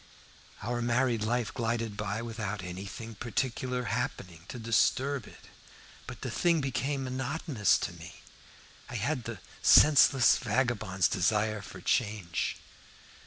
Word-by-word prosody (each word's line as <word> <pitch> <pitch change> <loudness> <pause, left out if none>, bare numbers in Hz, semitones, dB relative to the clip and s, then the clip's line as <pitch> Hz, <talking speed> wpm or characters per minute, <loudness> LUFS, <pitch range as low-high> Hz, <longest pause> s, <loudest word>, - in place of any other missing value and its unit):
Our 120 +2 -2
married 120 -1 +1
life 120 +1 -1
glided 115 -2 -2
by 105 +2 -3
without 110 -4 -4
anything 95 +5 -7
particular 125 +3 -2
happening 90 -8 -4
to - - -7
disturb 125 +3 +1
it. - - -15 0.6
But - - -8
the - - -4
thing 170 -2 +2
became 135 +1 -1
monotonous 130 - 0
to - - -4
me, 85 +1 -12 0.7
and 120 - -4
I - - -3
had 125 +1 -1
the 115 -2 -5 0.2
senseless 140 -3 +7
vagabond's 105 -5 +1
desire 105 +3 +1
for - - -10
change. 105 -7 -1
115 Hz, 125 wpm, -30 LUFS, 105-130 Hz, 0.7 s, senseless